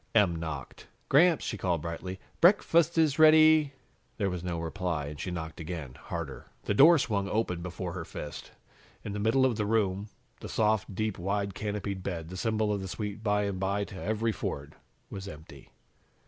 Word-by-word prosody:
Em 100 -6 +4
knocked. 80 -5 -6 0.2
"Gramps," 165 +4 +5
she 110 - -3
called 85 -4 0
brightly, 90 +3 -5 0.2
"break 185 +5 +6
fast 170 0 +3
is 155 -2 +3
rea 155 0 +9
dy." 155 -2 +6 0.4
There 100 -3 0
was 90 -1 -4
no 85 -2 -3
reply 85 -2 -2
and 75 0 -7
she 95 - -3
knocked 80 -3 -5
again, 80 -5 -6
harder. 75 -1 -6 0.2
The - - 0
door 160 +10 +8
swung 105 -7 -1
open 90 -4 -1
before 90 0 -5
her 90 -2 -4
fist. 75 -2 -8 0.5
In 100 - -5
the 105 - -3
middle 115 +5 +3
of 120 -5 +1
the 105 - 0
room, 100 -2 +1 0.3
the - - -8
soft, 110 -2 +1
deep, 110 -1 -2
wide, 100 +2 -1
canopied 100 -1 -3
bed, 85 -4 -4
the 90 - -7
symbol 110 0 0
of 100 - -2
the 95 - -5
sweet 105 +2 -5
by 105 -1 +1
and 100 -2 -2
by 100 +2 0
to 100 - -9
every 110 +2 0
Ford, 70 -8 -5 0.4
was 95 0 -6
empty. 75 -4 -11
100 Hz, 190 wpm, -29 LUFS, 85-110 Hz, 0.5 s, rea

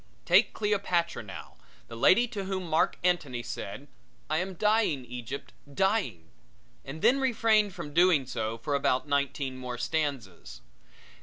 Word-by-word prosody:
Take - - +4
Cleopatra 195 - 0
now, 100 -4 -10 0.3
the 115 - -9
lady 225 - +5
to 205 -5 -5
whom 190 -1 -3
Marc 160 0 +1
Antony 145 -9 0
said: 120 +4 -7 0.4
"I 155 - +2
am 185 +1 -4
dying, 210 - +1
Egypt, 125 +3 -7 0.2
dying," 190 - -1 0.5
and 145 +4 -8
then 270 +3 +5
refrained 220 -6 +2
from 150 -5 -7
doing 170 -5 +4
so 110 -2 -3
for 145 +5 -4
about 140 0 +1
nineteen 140 -2 -1
more 125 -1 -5
stanzas. 120 - -3
150 Hz, 140 wpm, -28 LUFS, 125-195 Hz, 0.5 s, lady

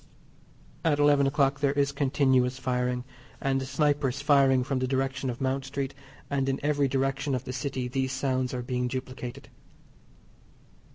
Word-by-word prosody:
At 155 -3 +3
eleven 145 -1 +4
o'clock 140 -1 +2
there 140 -1 +2
is 140 -1 +1
continuous 130 -2 +2
firing, 125 -1 -1 0.4
and 135 -1 0
snipers 140 0 0
firing 140 -3 +4
from 135 0 -1
the 130 - 0
direction 135 0 -1
of 120 - -4
Mount 135 0 0
Street, 135 0 -4 0.3
and 135 -1 0
in 135 - -1
every 145 -1 +2
direction 135 +1 0
of 125 - -3
the 130 - -5
City 130 -1 -3
these 130 +1 -1
sounds 130 -1 -1
are 125 -1 -3
being 125 0 -1
duplicated. 130 -1 -6
135 Hz, 155 wpm, -28 LUFS, 130-140 Hz, 0.4 s, eleven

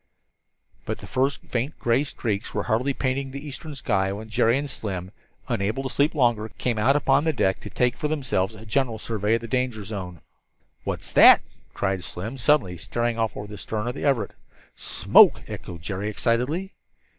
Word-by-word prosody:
But - - -2
the - - -11
first 135 +2 0
faint 130 +5 -3
gray 120 +4 +2
streaks 110 -8 -3
were 100 - 0
hardly 125 +6 +1
painting 135 0 -1
the 140 +3 -7
eastern 145 +2 -7
sky 95 -7 0
when 110 +3 -7
Jerry 115 +3 +3
and 145 +1 -2
Slim, 95 -8 -5 0.4
unable 110 +7 -1
to 130 - -3
sleep 145 +3 +2
longer, 120 -5 +2
came 120 -3 -1
out 135 +6 +4
upon 140 0 +3
deck 120 -12 +1
to - - -8
take 125 -1 +1
for 150 - -2
themselves 130 -10 -1
a 110 +1 -12
general 115 +1 0
survey 110 0 0
of 115 - -2
the 115 - -6
danger 125 -3 -1
zone. 95 -5 -6 0.6
"What's - - -4
that?" - - +9 0.3
cried 95 -2 -1
Slim 110 +11 -5
suddenly, 115 -9 +2
staring 120 +6 -2
off 110 -2 -1
over 105 - -5
the 105 0 -9
stern 105 +4 -3
of 120 - -1
the - - -6
Everett. 130 -8 +1 0.4
"Smoke!" - - +5
echoed 85 -2 -8
Jerry, 100 +3 -3
excitedly. 125 - 0
115 Hz, 180 wpm, -25 LUFS, 105-135 Hz, 0.6 s, that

